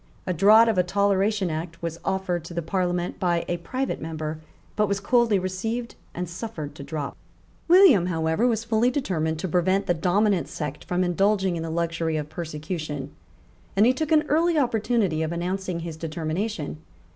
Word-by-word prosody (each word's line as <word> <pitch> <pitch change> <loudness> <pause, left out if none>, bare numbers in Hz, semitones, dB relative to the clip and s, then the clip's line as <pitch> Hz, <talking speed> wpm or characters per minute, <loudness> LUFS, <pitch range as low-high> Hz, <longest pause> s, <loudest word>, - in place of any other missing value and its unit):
A 180 - -1
draught 215 +7 +6
of 220 -5 +2
a - - +5
Toleration 200 0 +1
Act 165 +1 -5
was 165 0 -4
offered 190 -3 -1
to 170 - -9
the 170 - -2
Parliament 175 0 -1
by 175 -2 +1
a 175 - -1
private 255 +11 -3
member, 155 -1 -4 0.4
but 210 0 +2
was 200 0 0
coldly 235 -2 +3
received 220 +6 -3 0.2
and 180 +1 -3
suffered 170 -4 -6
to - - -10
drop, 150 -1 -4 0.5
William, 335 - +7
however, 160 +5 +1
was 225 -2 0
fully 230 +1 +2
determined 170 - -1
to 175 - -3
prevent 185 +3 +1
the 175 - +2
dominant 185 +3 +1
sect 150 -2 -5
from 180 +1 0
indulging 190 +1 +1
in 165 - -3
the 165 - -4
luxury 165 -1 -1
of 150 -1 -4
persecution; 155 -3 -5 0.6
and 205 +3 +5
he 250 - +5
took 310 +3 -3
an 310 -1 +4
early 330 +2 +2
opportunity 225 - +1
of 160 0 -1
announcing 180 0 -3
his 165 -2 -6
determination. 160 +2 -3
180 Hz, 175 wpm, -25 LUFS, 165-215 Hz, 0.6 s, William